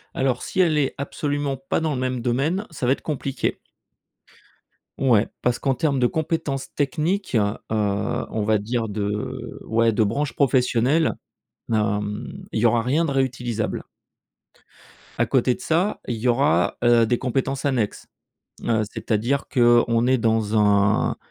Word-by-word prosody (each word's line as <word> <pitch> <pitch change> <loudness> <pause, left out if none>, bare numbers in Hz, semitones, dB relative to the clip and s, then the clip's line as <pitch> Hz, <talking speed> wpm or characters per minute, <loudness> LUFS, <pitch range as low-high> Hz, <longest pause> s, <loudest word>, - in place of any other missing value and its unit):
Alors, 130 -2 0
si 190 - -4
elle 165 -4 +4
est 135 - 0
absolument 145 0 -2
pas 135 - -2
dans 155 -2 0
le 130 - -3
même 130 -2 -2
domaine, 145 - 0
ça 135 -5 -4
va 130 - +5
être - - -7
compliqué. 140 -3 -2 1.4
Ouais, 120 -5 +3
parce 125 -1 0
qu'en 135 -2 0
termes 145 -3 0
de 125 - +4
compétences 160 -3 -3
techniques, 155 - -1
heu, 105 -1 +2 0.2
on 105 0 -1
va 110 0 +3
dire, 115 +1 -2
de 105 0 -4
ouais, 115 0 +2
de 110 - +3
branches 125 +5 -1
professionnelles, 135 +3 +2 0.6
hem, 105 -1 -2
il 110 - 0
y - - 0
aura 115 0 +3
rien 145 +7 +1
de 150 - -1
réutilisable. 125 -4 -1 1.4
À - - +4
côté 125 - +2
de - - -10
ça, 175 +6 0
il 120 - -1
y 120 +3 0
aura, 140 +5 +2
heu, 120 -1 +5
des 120 +2 +1
compétences 135 +2 -2
annexes. 120 -7 -1 0.6
Heu, 110 -2 +1
c'est-à-dire 120 +6 -1
qu'on 120 -1 +4
est 130 0 +4
dans 110 -1 +1
un 100 0 +3
125 Hz, 150 wpm, -23 LUFS, 110-140 Hz, 1.4 s, va